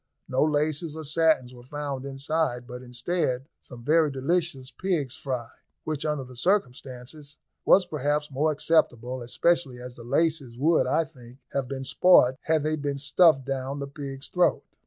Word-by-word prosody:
No 130 - 0
laces 155 +1 0
or 160 - -6
satins 150 -4 +2
were 120 - -12
found 140 0 -5
inside, 135 -2 -1
but 125 +1 -8
instead 130 +1 -2
some 120 -2 -12
very 155 +3 +4
delicious 140 -1 -1
pig's 150 -3 -2
fry, 125 -4 -4 0.4
which, 155 -1 -3
under 150 -3 -1
the 125 0 -12
circumstances, 140 -2 -2 0.3
was 190 - +6
perhaps 150 -2 -1
more 150 +4 +1
acceptable, 130 -5 +1
especially 135 +2 +1
as 125 0 -8
the 120 - -12
laces 140 -1 0
would, 160 +5 +3
I 165 - +2
think, 125 -5 -15 0.2
have 135 -2 -1
been 135 0 -5
spoilt 130 -3 +5
had 160 -2 +2
they 155 0 0
been 145 -1 -2
stuffed 150 -1 +4
down 135 0 -3
the 140 - -4
pig's 140 -1 -7
throat. 180 -1 +2
140 Hz, 160 wpm, -26 LUFS, 130-155 Hz, 0.4 s, was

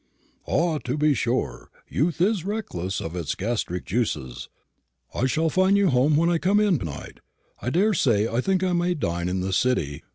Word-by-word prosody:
"Ah, 165 -2 +1
to 130 +2 -3
be 150 0 +3
sure; 120 +1 -2 0.2
youth 165 +5 -1
is 195 -2 +2
reckless 175 - -3
of 80 +2 -5
its 85 -5 -3
gastric 100 -4 -3
juices. 75 - -3 0.6
I 130 - 0
shall 160 +4 0
find 190 +3 +3
you 200 - +3
at - - 0
home 140 +4 +3
when 165 +2 +3
I 170 -1 +2
come 195 +5 +3
in 200 -8 +2
to - - -5
night, 75 - -8 0.4
I - - -2
daresay. 150 - +2
I 115 +2 -1
think 190 +4 0
I 185 -1 +1
may 175 +1 +1
dine 85 - -2
in 95 0 -1
the 95 +1 -2
city. 85 - 0
135 Hz, 195 wpm, -24 LUFS, -, 0.6 s, be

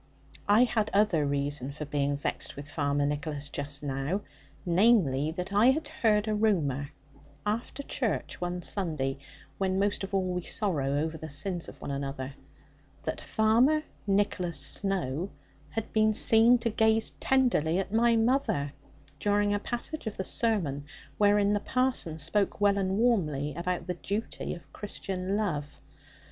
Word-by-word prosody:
I 210 +4 +6
had 220 -3 +1
other 180 -8 +3
reason 140 -1 0
for 150 +2 -6
being 145 -1 0
vexed 145 - -2
with 140 +1 -8
Farmer 145 -1 0
Nicholas 145 0 -3
just 145 +1 -2
now, 140 +7 -2 0.4
viz. 170 - +3
that 180 +2 -4
I 210 +4 +5
had 295 +3 +2
heard 220 -8 +2
a 215 - +1
rumour, 155 -11 +1 0.6
after 230 +6 -2
church - - -2
one 175 0 -3
Sunday 150 -9 -1 0.4
when 190 -1 +1
most 200 0 0
of 195 - -5
all 185 -1 0
we 180 - -2
sorrow 150 -9 -1
over 160 +2 -2
the 160 - -7
sins 170 +5 -2
of - - -13
one - - -5
another 140 -1 -4 0.7
that - - -4
Master 240 +8 +4 0.2
Nicholas 195 -3 +1
Snowe 185 -4 0 0.4
had 225 -1 -5
been 215 -1 +3
seen 225 +3 +6
to 230 -1 -1
gaze 220 0 +3
tenderly 240 - +2
at 195 +1 -2
my 235 +1 +4
mother, 225 - +1 0.5
during 205 0 +2
a 205 - +1
passage 240 +6 -4
of 215 - -4
the 190 - -1
sermon, 185 - 0 0.4
wherein 205 0 +4
the 205 - +2
parson 255 -10 0
spoke 180 +7 0
well 200 -1 +3
and 190 0 0
warmly 155 - +1
about 175 +3 -2
the 180 - -2
duty 200 +5 -4
of 170 - -15
Christian 195 -1 -4
love. 150 -9 -2
190 Hz, 155 wpm, -29 LUFS, 145-215 Hz, 0.7 s, I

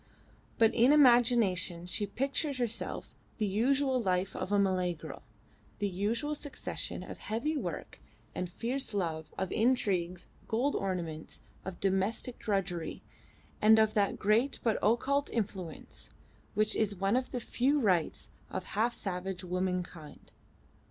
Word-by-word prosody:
But 225 0 +5
in 240 +4 +5
imagination 235 - +4
she 205 +3 0
pictured 275 +6 -1
to 250 - 0
herself 230 -1 -3 0.2
the 215 - +1
usual 260 +6 +2
life 185 -2 0
of 185 - -4
a 205 - +4
Malay 185 -3 +2
girl 155 -2 -9 0.6
the 205 - 0
usual 215 +10 -1
succession 290 -1 -3
of - - -9
heavy 250 +9 -2
work 290 - -4 0.3
and 180 -1 -3
fierce 235 +5 -3
love, 160 -5 -2
of 190 -1 -2
intrigues, 190 -7 +1 0.2
gold 250 +6 +1
ornaments, 170 -5 -3 0.2
of 190 -2 -6
domestic 195 +5 0
drudgery, 195 -5 -2 0.6
and 220 +1 +7
of 220 -1 +4
that 200 -2 +1
great 225 +7 +2
but 225 -2 +2
occult 275 +6 +2
influence 190 -7 -5 0.5
which 215 0 +2
is 210 -2 +1
one 195 +4 +1
of 255 0 0
the 250 - -3
few 265 +5 +1
rights 185 - +1 0.2
of 185 - -4
half 230 +4 +1
savage 185 -1 -3
womankind. 180 -3 -4
205 Hz, 140 wpm, -31 LUFS, 185-240 Hz, 0.6 s, and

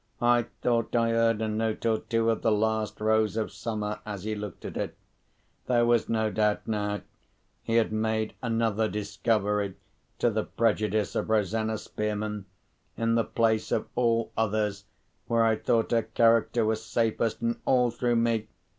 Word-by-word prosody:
I 120 -1 +3 0.2
thought 115 -1 +1
I 115 -1 +3
heard 115 -1 +2
a - - 0
note 110 +1 -2
or 110 -1 +2
two 115 0 +1
of 115 - -2
"The 115 - +2
Last 110 0 0
Rose 110 0 +2
of 110 - -1
Summer" 105 -2 -4
as 100 -3 -6
he 110 +1 -2
looked 105 -3 -7
at - - -6
it. - - -4 0.7
There 120 -2 +3
was 120 -1 +2
no 110 -1 +1
doubt 105 +1 0
now! 105 -2 -1 0.6
He 115 - -2
had 115 -2 +3
made 110 0 0
another 115 -2 0
discovery 105 -1 -1 0.4
to 120 - +2
the 110 0 0
prejudice 110 -2 0
of - - -2
Rosanna 110 +1 +1
Spearman, 105 -1 -4 0.5
in 115 0 +1
the 115 0 +3
place 110 -1 0
of - - -1
all 115 -2 +1
others 105 -2 -1 0.4
where 115 -1 +3
I 110 0 +3
thought 115 +1 0
her 115 -1 +3
character 115 +1 +3
was 110 0 0
safest, 115 0 0
and 115 0 -1
all 125 -2 +3
through 120 0 0
me! 115 -2 +1
110 Hz, 165 wpm, -27 LUFS, 105-115 Hz, 0.7 s, I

